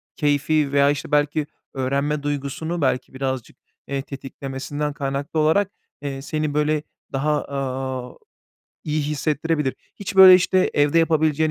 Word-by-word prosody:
keyfi 150 0 +1
veya, 140 0 +5
işte, 145 0 -5
belki 150 0 +1 0.3
öğrenme 140 +2 -1
duygusunu 145 +4 -3
belki 130 -1 0
birazcık, 130 -2 -4 0.3
eee, 140 -1 -2
tetiklemesinden 140 +1 -5
kaynaklı 140 +1 -3
olarak, 180 +6 +3 0.3
eee, 135 -2 -4
seni, 155 +1 -2
böyle, 150 0 +1 0.3
daha, 150 +2 +1
aaa, 130 -2 -4 0.7
iyi 155 0 0
hissettirebilir. 150 0 -1 0.2
Hiç, 200 -1 -6
böyle, 190 -1 +11
işte, 185 0 +3
evde 145 +3 +3
yapabileceğin, 160 -1 +2
145 Hz, 125 wpm, -22 LUFS, 135-155 Hz, 0.7 s, böyle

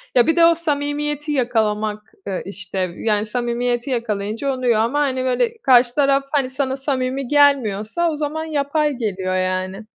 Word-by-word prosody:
ya, 245 +1 +5
bir 325 - +3
de 335 - +6
o 335 0 +5
samimiyeti 295 -1 -2
yakalamak 215 -5 -1
eee, 190 -2 -2
işte, 195 0 -8 0.2
yani, 210 -1 0
samimiyeti 240 +2 -2
yakalayınca 230 +2 -2
oluyor 245 -4 +1
ama, 240 +6 +1
hani, 260 -3 0
böyle, 455 - 0
karşı 245 -1 +5
taraf, 275 -1 +3
hani, 275 -4 +1
sana 265 0 -2
samimi 265 -1 -2
gelmiyorsa 280 0 +2
o - - -3
zaman 305 +2 -3
yapay 300 -1 0
geliyor, 190 -6 -2
yani. 185 +2 -2
255 Hz, 155 wpm, -20 LUFS, 215-290 Hz, 0.2 s, de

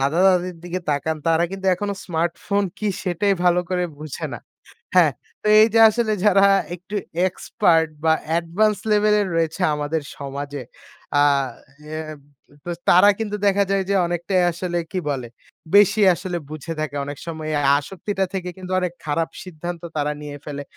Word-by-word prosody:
দাদা-দাদির 180 +5 +2
দিকে 175 +1 -3
তাকান 150 +2 -1
তারা 165 +1 +3
কিন্তু 195 0 -5
এখনো 200 +2 -3
স্মার্টফোন 175 +4 -1
কী 215 - -1
সেটাই 195 +2 +1
ভালো 180 0 +4
করে 180 -1 +1
বোঝে 150 -2 -5
না। - - -6 0.6
হ্যাঁ, - - +6 0.3
তো - - -3
এই 220 - +7
যে 225 - +5
আসলে 220 0 0
যারা 200 -1 +6 0.3
একটু 180 +4 -9 0.3
expert 175 -3 +1 0.2
বা 160 0 +4 0.3
advance 200 +5 0
level 210 0 +4
এর 200 - -1
রয়েছে 165 +2 -1
আমাদের 150 +2 -2 0.2
সমাজে, 140 0 -5 0.6
আ - - +5 0.7
অ্যাব 155 -1 -6 0.5
তো 175 - -3 0.2
তারা 185 +4 +7
কিন্তু 210 -2 -2
দেখা 200 0 +3
যায় 195 -1 +2
যে 200 - +2
অনেকটাই 175 +2 0
আসলে 175 +1 -3
কী 185 - -1
বলে 130 -4 -3 0.5
বেশি 205 +1 +6
আসলে 180 0 -4
বুঝে 155 +2 -6
থাকে। 155 -2 -3
অনেক 145 0 -6
সময় 160 -2 -5
এই 155 - 0
আ 145 - -1 0.2
আসক্তিটা 190 +5 -3
থেকে 180 -1 -3
কিন্তু 185 0 -8
অনেক 180 -2 -2
খারাপ 160 +2 0
সিদ্ধান্ত 175 -1 -7 0.2
তারা 150 0 0
নিয়ে 145 -1 -7
ফেলে 145 -1 -5
175 Hz, 165 wpm, -22 LUFS, 155-195 Hz, 0.7 s, এই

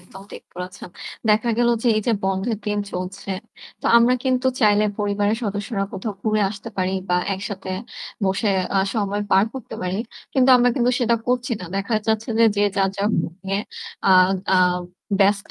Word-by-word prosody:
একদম 185 +2 -13
ঠিক - - -9
বলেছেন। 180 0 -7 0.4
দেখা 220 +3 +3
গেল 240 0 +3
যে 245 - +2
এই 215 - 0
যে 235 - +3
বন্ধের 195 +3 -1
দিন 210 0 0
চলছে, 185 +2 -5 0.5
তো - - -3
আমরা 240 +2 +5
কিন্তু 255 0 +1
চাইলে 210 -1 +4
পরিবারের 205 +1 +1
সদস্যরা 205 0 -2
কোথাও 200 +2 -4
ঘুরে 215 -1 +1
আসতে 205 0 -8
পারি 185 0 0
বা 180 - +3 0.2
একসাথে 190 -1 -6 0.5
বসে 195 +3 +1 0.3
আ - - +5 0.2
সময় 205 -1 -1
পার 190 +2 +5
করতে 260 - -7
পারি। 185 +2 -2 0.3
কিন্তু 260 0 +3
আমরা 245 0 +4
কিন্তু 250 -2 +2
সেটা 235 -1 +2
করছি 245 0 0
না। - - -6
দেখা 200 +3 -1
যাচ্ছে 220 +2 0
যে, 230 - +6
যে 205 - +2
যার, 195 -1 +3
যার 200 +1 +1
phone 170 - -2
নিয়ে 195 +1 -1 0.5
আ - - +6 0.4
আ - - +5 0.6
ব্যস্ত। 200 +1 +2
205 Hz, 180 wpm, -22 LUFS, 195-230 Hz, 0.6 s, যে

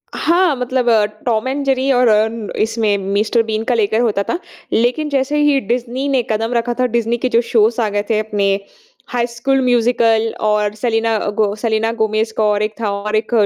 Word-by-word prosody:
हाँ 340 -2 +2
मतलब 250 0 -1
अ, 220 -2 +4 0.2
Tom 230 0 0
and 275 +2 -2
Jerry 270 0 +1
और 250 -1 +3
अ, 215 0 +4 0.3
इसमें 220 -2 +1
मिस्टर 205 +4 0
बीन 220 0 -2
का 245 +1 0
लेकर 220 0 +1
होता 210 -4 +1
था। 345 - -1 0.3
लेकिन 245 +7 +1
जैसे 280 +1 0
ही 295 -2 +3
डिज्नी 245 +5 -2
ने 265 -2 +2
कदम 225 +2 -1
रखा 240 0 0
था 255 - +3
डिज्नी 235 +1 0
के 255 +2 -1
जो 235 -1 +3
शोज़ 225 +1 +3
आ 215 - 0
गए 205 0 -1
थे 220 -2 +2
अपने 205 -2 -1 0.6
हाई 240 -1 0
स्कूल 265 +3 0
म्यूज़िकल 230 -2 +2 0.2
और 210 -1 +1
सेलिना 225 0 0 0.2
गो 205 -1 +1
सेलिना 220 0 0
गोमेज़ 220 +1 0
का 215 - +2
और 210 0 +1
एक 215 0 -2
था 210 - 0
और 210 +1 -2
एक 215 0 0
कोडी 220 -3 +4
230 Hz, 205 wpm, -17 LUFS, 215-250 Hz, 0.6 s, अ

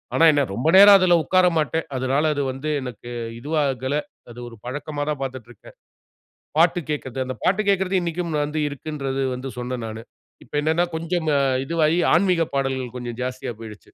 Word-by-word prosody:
ஆனா - - +3
என்ன 145 - +2
ரொம்ப 120 +8 -2
நேரம் 200 0 +10
அதில 180 -2 +4
உட்கார 185 +2 +3
மாட்டேன். 160 +1 0
அதனால 130 +3 0
அது 145 - -1
வந்து 135 +4 -5
எனக்கு 120 -1 -8 0.3
இதுவாகல. 140 -1 -1 0.4
அது 120 - -11
ஒரு 115 - -13
பழக்கமா 145 +3 -5
தான் 150 - -2
பார்த்துட்டு 130 -3 -6
இருக்கேன். 115 - -16 0.8
பாட்டு 170 +1 +4
கேட்கிறது. 130 -3 -4
அந்த 130 0 -5
பாட்டு 195 +3 +2
கேட்கிறது 190 -1 +2
இன்னக்கும் 170 -1 -3
வந்து 150 +1 -3
இருக்குன்றது 135 -2 -4
வந்து 130 +2 -6
சொன்னேன் 125 -1 -4
நானு. 110 +1 -7 0.4
இப்ப - - -25
என்னன்னா, 160 +3 +2
கொஞ்சம் 165 0 -2 0.4
இதுவாகி 165 +1 +1 0.2
ஆன்மீகப் 175 -3 +2
பாடல்கள் 130 -3 -2
கொஞ்சம் 120 -1 -6
ஜாஸ்தியா 130 -1 -4
போயிடுச்சு. 105 -3 -9
145 Hz, 165 wpm, -22 LUFS, 130-165 Hz, 0.8 s, நேரம்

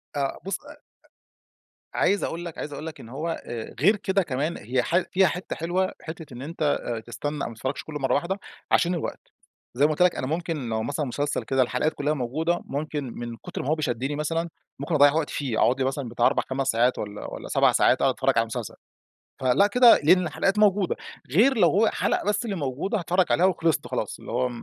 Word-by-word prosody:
آه 140 -1 -1
بُص 195 - -2
أ 290 - -12
أ 300 - -14 1.2
عايز 200 0 +2
أقول 170 +1 -3
لك 170 - -7
عايز 145 - -5
أقول 150 - -6
لك 160 - -7
إن 115 - -11
هو 160 +6 -4
آآ 115 -2 -6
غير 195 - +5
كده 195 -2 0
كمان، 150 +3 -2
هي 125 +4 -1
ح 175 - +1
فيها 190 0 +4
حتة 180 +4 -4
حلوة، 180 +3 -1
حتة 160 -3 -8
إن 120 - -8
أنت 160 +4 -8 0.2
آآ 115 -2 -3
تستنى 145 +6 -5
أو - - -2
ما 115 - -10
تتفرجش 130 +4 -4
كله 150 -2 -6
مرة 135 -2 +1
واحدة 175 +7 0 0.3
عشان 175 +1 +3
الوقت. 165 - -6 0.4
زي 140 +4 +4
ما 155 - +3
قُلت 155 - -2
لك 180 -1 +5
أنا 130 - -3
ممكن 160 -4 -3
لو 110 0 -1
مثلًا 145 +3 -2
مسلسل 145 +3 -2
كده 135 -1 +1
الحلقات 125 +5 +1
كلها 145 +1 0
موجودة، 155 +6 -1
ممكن 150 +1 -3
من 120 -1 -5
كتر - - -6
ما - - -6
هو 155 - +3
ب 155 - -5
شدني 135 +1 -1
مثلًا، 165 +3 -1 0.3
ممكن 170 - -2
أضَّيع 145 -1 +6
وقتي 160 -1 -1
فيه، 130 -6 -2
أقعد 130 +2 +3
لي 130 - +1
مثلًا 135 -2 -2
بتاع 120 0 +1
4،5 135 0 -1
ساعات 120 0 +2
والّا 105 0 -6
والّا - - -7
7 - - +4
ساعات - - +3
أقعد - - +3
أتفرج - - +1
على 115 - +5
المسلسل. 115 -2 -5 0.6
فلأ 130 +11 +4
كده 240 +3 +7
لإن 180 +3 +5
الحلقات 195 +5 0
موجودة، 200 -3 +3 0.4
غير 235 - +4
لو 175 -5 +5
هو 215 +4 +3
حلقة - - 0
بس 210 +3 0
اللي 205 -4 -2
موجودة 155 - -2
هاتفرج 180 +2 +2
عليها 180 - +4
وخلصت 165 -4 +1
خلاص - - -3
اللي - - -9
هو 125 - +1
150 Hz, 220 wpm, -25 LUFS, 130-180 Hz, 1.2 s, كده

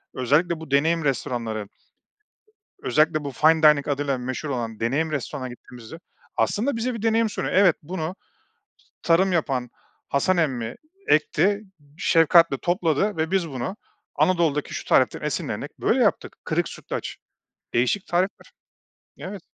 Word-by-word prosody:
özellikle 155 +6 +1
bu 160 -4 -10
deneyim 160 +4 +2
restoranları 115 -5 -2 1.1
özellikle 155 - +1
bu 140 - -4
fine 160 +3 +3
dining 150 -2 +5
adıyla 140 -2 -1
meşhur 130 +4 -4
olan 115 -4 -4
deneyim 140 +8 0
restorana 135 -1 -4
gittiğimizde 125 +4 -11 0.4
aslında 240 +5 0
bize 240 +2 -2
bir 225 - -6
deneyim 225 0 +2
sunuyor. - - -3
"Evet, 185 -3 +5
bunu 165 +2 -4 0.9
tarım 185 +3 +3
yapan 135 -7 -1 0.4
Hasan 180 +7 +1
emmi 125 -8 -1 0.3
ekti, 190 +7 +2 0.4
şefkatle 165 -3 +4
topladı 175 +2 0
ve 160 0 -1
biz 185 -4 +1
bunu 130 +7 -4 0.4
Anadolu'daki 165 -5 +1
şu - - -5
tariften - - +2
esinlenerek - - -4
böyle - - +2
yaptık." - - 0
Kırık - - 0
sütlaç. - - -6 0.6
Değişik 125 - +1
tarifler. 180 +3 -2 0.7
Evet. 190 -1 -7
155 Hz, 130 wpm, -24 LUFS, 135-180 Hz, 1.1 s, dining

